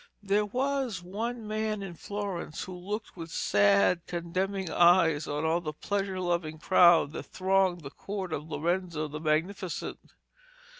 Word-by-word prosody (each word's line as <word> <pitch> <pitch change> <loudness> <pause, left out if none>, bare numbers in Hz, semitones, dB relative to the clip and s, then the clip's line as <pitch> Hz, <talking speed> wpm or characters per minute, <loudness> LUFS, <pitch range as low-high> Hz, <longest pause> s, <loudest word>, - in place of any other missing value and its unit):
There 205 +1 +2
was 255 -4 -1
one 225 +5 -4
man 215 -1 -2
in 190 -3 -6
Florence 195 -3 -5
who 185 - -7
looked 205 +5 -5
with 165 -2 -7
sad 100 - +3
condemning 185 +2 -2
eyes 170 -3 +4
on 150 +2 -2
all 165 +2 +2
the 155 -3 -4
pleasure 195 +3 -2
loving 170 -3 -1
crowd 175 -2 +5
that 160 - -5
thronged 190 -2 +1
the 140 -2 -8
court 190 0 -5
of 150 +2 -4
Lorenzo 170 0 -1
the 150 +1 -6
Magnificent. 165 +4 -1
180 Hz, 145 wpm, -29 LUFS, 160-200 Hz, -, crowd